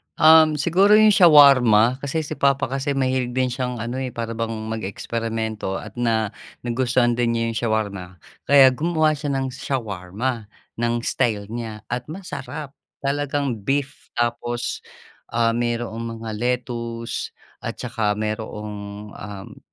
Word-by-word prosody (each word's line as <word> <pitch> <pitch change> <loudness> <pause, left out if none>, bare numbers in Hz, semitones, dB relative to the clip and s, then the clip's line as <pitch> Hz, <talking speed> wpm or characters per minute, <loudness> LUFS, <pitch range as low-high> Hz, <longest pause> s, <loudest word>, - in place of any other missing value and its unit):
Um, 160 -1 +7
siguro 180 +8 +4
yung 215 0 +7
shawarma 135 - +6
kasi 140 +3 -2
si 145 - -6
papa 140 -2 +2
kasi 135 +1 -1
mahilig 130 -2 0
din 130 -1 +1
siyang 125 -2 -3
ano, 120 +3 -4
eh, 130 -2 -4
para 115 -1 -3
bang 115 0 -3 0.2
mag-eksperimento 110 0 -3
at 120 - -7
na 110 -3 +1 0.3
nagustuhan 120 0 +1
din 115 -1 +1
niya 115 - 0
yung 115 - -4
shawarma. 105 -4 -1 0.4
Kaya 135 -2 +7
gumawa 155 +3 +1
siya 145 -2 -2
ng 135 -1 -2
shawarma 110 -2 -3 0.3
ng 120 0 +1
style 110 -6 0
niya 115 -2 -6
at 125 0 -3
masarap, 155 -4 -7 0.3
talagang 140 -3 -1
beef 135 +6 -2
tapos 120 0 -2 0.6
mayroong 115 0 -1
mga 110 - -4
lettuce 120 -1 -3 0.2
at - - -5
saka 105 -2 -1
mayroong, 105 -1 -5
um. 100 -2 -9
120 Hz, 130 wpm, -22 LUFS, 110-135 Hz, 0.6 s, Um